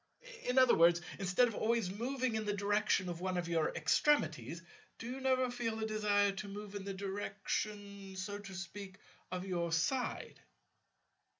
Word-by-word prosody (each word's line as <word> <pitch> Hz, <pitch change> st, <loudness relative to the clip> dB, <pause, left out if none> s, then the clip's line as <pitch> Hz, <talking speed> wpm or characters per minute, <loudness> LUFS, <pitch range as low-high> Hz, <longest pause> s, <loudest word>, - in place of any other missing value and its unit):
In 250 Hz, +1 st, 0 dB
other 255 Hz, -2 st, +7 dB
words, 170 Hz, +1 st, +6 dB, 0.2 s
instead 195 Hz, +6 st, +3 dB
of 230 Hz, -, -4 dB
always 220 Hz, -3 st, +1 dB
moving 250 Hz, +4 st, -1 dB
in 220 Hz, -1 st, -1 dB
the 205 Hz, -1 st, 0 dB
direction 205 Hz, -1 st, +2 dB
of 175 Hz, -1 st, -4 dB
one 185 Hz, -1 st, -1 dB
of 175 Hz, -1 st, -1 dB
your 165 Hz, -2 st, +1 dB
extremities, 170 Hz, -, +2 dB, 0.3 s
do -, -, -8 dB
you 255 Hz, +3 st, -5 dB
never 260 Hz, -1 st, +2 dB
feel 230 Hz, -2 st, -2 dB
a 220 Hz, -, -1 dB
desire 205 Hz, -2 st, +2 dB
to 195 Hz, +1 st, -6 dB
move 205 Hz, 0 st, -7 dB
in 200 Hz, -1 st, -5 dB
the 200 Hz, -, -3 dB
direction, 200 Hz, 0 st, -4 dB
so 200 Hz, +2 st, -4 dB
to 195 Hz, -2 st, -9 dB
speak, 195 Hz, +1 st, -7 dB, 0.3 s
of 180 Hz, 0 st, -3 dB
your 170 Hz, -3 st, -1 dB
side? 165 Hz, +11 st, -1 dB
200 Hz, 170 wpm, -35 LUFS, 185-220 Hz, 0.3 s, other